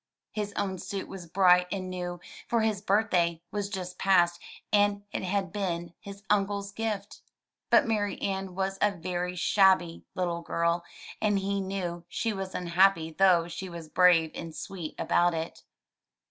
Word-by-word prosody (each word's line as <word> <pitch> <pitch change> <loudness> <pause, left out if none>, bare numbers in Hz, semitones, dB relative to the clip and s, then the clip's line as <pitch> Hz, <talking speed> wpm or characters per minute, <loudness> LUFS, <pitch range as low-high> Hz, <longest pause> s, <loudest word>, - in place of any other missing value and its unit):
His 210 -1 -3
own 190 -2 -2
suit 190 +1 -5
was 185 -3 -9
bright 180 0 +5
and 190 -2 -3
new, 180 -1 -4 0.3
for 235 -1 +2
his 215 -3 0
birthday 185 -5 +1
was 205 -1 -2
just 185 -3 -6
past 175 -3 +3 0.3
and 205 0 +3
it - - -3
had 190 -1 -1
been 175 -4 -3
his 200 -1 -10
uncle's 200 -1 0
gift. 210 -1 -4 0.5
But - - +6
Marianne 200 -3 -2
was 195 0 -2
a 210 - +5
very 180 0 -3
shabby 185 -2 +3
little 175 -2 -1
girl, 170 +1 0 0.4
and 205 -2 +2
he 195 0 -1
knew 185 -3 -4
she 225 -2 -1
was 195 -1 -5
unhappy 175 -1 +3
though 175 -1 +4
she 185 +2 -6
was 170 -2 -8
brave 170 -2 +5
and 165 -2 -7
sweet 175 -5 -6
about 175 -1 +2
it. 160 +1 -5
190 Hz, 155 wpm, -28 LUFS, 175-200 Hz, 0.5 s, But